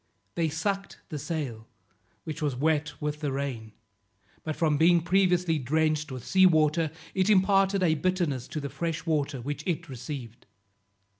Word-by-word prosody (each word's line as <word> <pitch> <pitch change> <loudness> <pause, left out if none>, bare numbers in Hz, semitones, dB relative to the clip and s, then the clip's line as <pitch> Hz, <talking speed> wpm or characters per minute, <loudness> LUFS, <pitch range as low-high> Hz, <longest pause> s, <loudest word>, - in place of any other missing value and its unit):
They 165 -2 0
sucked 195 +6 -3
the 150 -4 -4
sail, 135 -7 -4 0.6
which 155 0 -6
was 145 -4 0
wet 155 +3 0
with 150 0 -3
the 145 -2 -2
rain, 130 -5 -4 0.7
but 155 -1 -3
from 155 -3 +2
being 170 +3 +5
previously 180 -2 +2
drenched 155 +2 0
with 130 -3 -7
sea 190 0 +6
water, 155 -1 +3 0.2
it 190 +1 +1
imparted 195 -1 +4
a 165 -3 +4
bitterness 160 -6 -1
to 155 - -4
the 140 -1 -4
fresh 160 +5 -3
water 145 -5 -1
which 145 +4 -4
it 170 -5 -2
received. 125 -2 -7
155 Hz, 155 wpm, -28 LUFS, 140-175 Hz, 0.7 s, sea